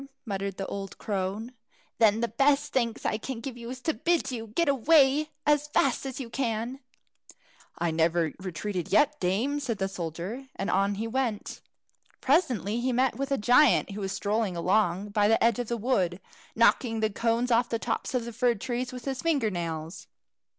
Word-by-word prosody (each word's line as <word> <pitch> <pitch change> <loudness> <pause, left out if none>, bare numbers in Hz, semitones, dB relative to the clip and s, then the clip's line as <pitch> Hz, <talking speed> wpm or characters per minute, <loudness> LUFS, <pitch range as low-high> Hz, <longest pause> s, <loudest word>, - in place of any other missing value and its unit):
muttered 195 -2 -3
the 195 - -3
old 195 -1 -6
crone; 205 +3 -3 0.5
"then 220 -1 +4
the 235 - +1
best 280 +6 +2
thanks 235 -3 -1
I 215 - 0
can 260 0 -5
give 250 +1 -6
you 235 -1 -8
is 255 0 -7
to 320 - 0
bid 340 -4 0
you 225 -3 -5
get 330 +10 0
away 280 +2 +4 0.2
as 295 0 +3
fast 275 -2 +1
as 260 0 -6
you 260 - -5
can." 235 +1 -2 1.0
"I 170 -1 0
never 165 0 +1
retreated 185 0 -4
yet, 300 0 +3
dame," 225 +11 0
said 245 -6 -2
the 195 -1 -1
soldier, 185 - -5
and 195 - -2
on 195 +2 +2
he 215 +3 -3
went. 235 -3 -2 0.6
Presently 245 - +1
he 255 +1 0
met 255 +1 +2
with 275 +1 -3
a 275 - +2
giant, 245 +1 +4
who 205 +1 -6
was 195 -1 -2
strolling 205 -2 -1
along 190 +2 +1
by 205 0 +2
the 225 - +3
edge 230 0 +3
of 245 - -2
the 235 - -2
wood, 195 -7 0 0.4
knocking 230 0 +3
the 220 0 +1
cones 235 +3 0
off 235 +1 +3
the 230 - 0
tops 255 - -3
of 240 -2 0
the 235 - -7
fir 245 0 +2
trees 245 +4 -3
with 250 -1 -8
his 265 -2 -3
finger 285 -10 +1
nails. 165 -1 -5
230 Hz, 190 wpm, -28 LUFS, 200-260 Hz, 1.0 s, then